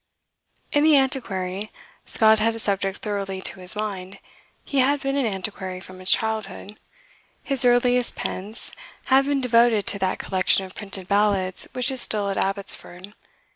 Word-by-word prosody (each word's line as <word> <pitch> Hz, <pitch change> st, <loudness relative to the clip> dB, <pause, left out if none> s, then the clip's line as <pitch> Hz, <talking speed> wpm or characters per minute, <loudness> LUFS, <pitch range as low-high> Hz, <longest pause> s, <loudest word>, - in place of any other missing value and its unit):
In 290 Hz, -, +2 dB
"The 310 Hz, -2 st, +6 dB
Antiquary" 210 Hz, -, -2 dB, 0.4 s
Scott 220 Hz, -1 st, +4 dB
had 225 Hz, +1 st, +1 dB
a -, -, -5 dB
subject 195 Hz, -3 st, -1 dB
thoroughly 195 Hz, -2 st, -3 dB
to -, -, -3 dB
his 185 Hz, +2 st, 0 dB
mind. 200 Hz, -3 st, -5 dB, 0.5 s
He 280 Hz, -, -1 dB
had 280 Hz, +3 st, +3 dB
been 275 Hz, 0 st, -2 dB
an 275 Hz, -4 st, +1 dB
antiquary 190 Hz, -2 st, -5 dB
from 185 Hz, 0 st, -13 dB
his 185 Hz, 0 st, 0 dB
childhood. 215 Hz, -2 st, -1 dB, 0.6 s
His 275 Hz, -3 st, +2 dB
earliest 245 Hz, 0 st, +3 dB
pence 205 Hz, +5 st, -3 dB, 0.4 s
had 270 Hz, +1 st, +5 dB
been 280 Hz, -1 st, 0 dB
devoted 235 Hz, -4 st, +3 dB
to 200 Hz, -, -1 dB
that 190 Hz, -1 st, -1 dB
collection 190 Hz, 0 st, +1 dB
of 185 Hz, -, -12 dB
printed 195 Hz, -3 st, -5 dB
ballads 200 Hz, -2 st, +1 dB
which 250 Hz, +1 st, +3 dB
is 260 Hz, -2 st, +2 dB
still 205 Hz, -2 st, +1 dB
at 195 Hz, -, -4 dB
Abbotsford. 195 Hz, -1 st, -2 dB
210 Hz, 160 wpm, -23 LUFS, 190-245 Hz, 0.6 s, The